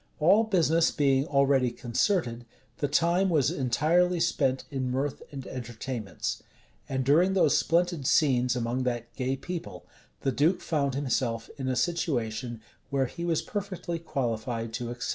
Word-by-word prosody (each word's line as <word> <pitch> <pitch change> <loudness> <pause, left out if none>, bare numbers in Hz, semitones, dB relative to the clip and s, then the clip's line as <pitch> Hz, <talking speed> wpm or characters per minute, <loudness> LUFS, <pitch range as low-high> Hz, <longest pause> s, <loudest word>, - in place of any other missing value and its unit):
All 195 +9 +5
business 170 -5 +3
being 140 -1 +2
already 140 -3 +3
concerted, 120 - -1 0.3
the 145 - +1
time 170 +6 +2
was 155 -6 +2
entirely 165 +7 +2
spent 135 -5 +1
in 130 -2 -2
mirth 135 +2 -2
and 135 -3 -7
entertainments; 120 -2 -5 0.5
and 130 -1 -1
during 175 +8 +4
those 165 -6 +4
splendid 170 -4 +1
scenes 125 -4 +3
among 120 +1 -1
that 120 -1 -3
gay 130 0 -1
people, 175 +5 -7 0.4
the 135 - +1
duke 155 +8 +2
found 140 -4 0
himself 125 -4 -1
in 130 - -3
a 130 - 0
situation 125 -7 -1 0.3
where 135 -1 +1
he 170 +7 -7
was 170 -2 0
perfectly 190 -4 -4
qualified 115 -6 -3
to 120 0 -3
excel. 120 0 -4
135 Hz, 145 wpm, -28 LUFS, 125-165 Hz, 0.5 s, All